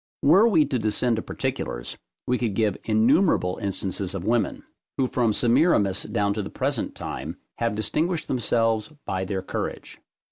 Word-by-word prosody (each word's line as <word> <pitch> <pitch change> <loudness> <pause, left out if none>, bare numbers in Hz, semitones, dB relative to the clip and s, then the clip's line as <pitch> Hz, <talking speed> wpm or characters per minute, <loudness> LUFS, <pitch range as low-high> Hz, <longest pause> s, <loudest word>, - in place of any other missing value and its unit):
Were 190 +10 +6
we 165 -9 +4
to 135 -3 -1
descend 110 +2 +1
to - - -1
particulars, - - -4 0.3
we 125 0 0
could 115 -5 -1
give 105 -3 +1
innumerable 115 - +3
instances 95 -1 -3
of 95 -1 -4
women, 115 +1 0 0.3
who 135 - +2
from 120 -3 +1
Semiramis 115 - +3
down 100 0 +1
to 105 - -2
the 100 - -5
present 135 -2 -2
time, - - -6 0.2
have 115 -2 0
distinguished 160 +10 -1
themselves 115 -2 +1
by 95 0 -2
their 95 0 -3
courage. - - -5
115 Hz, 155 wpm, -25 LUFS, 100-130 Hz, 0.3 s, Were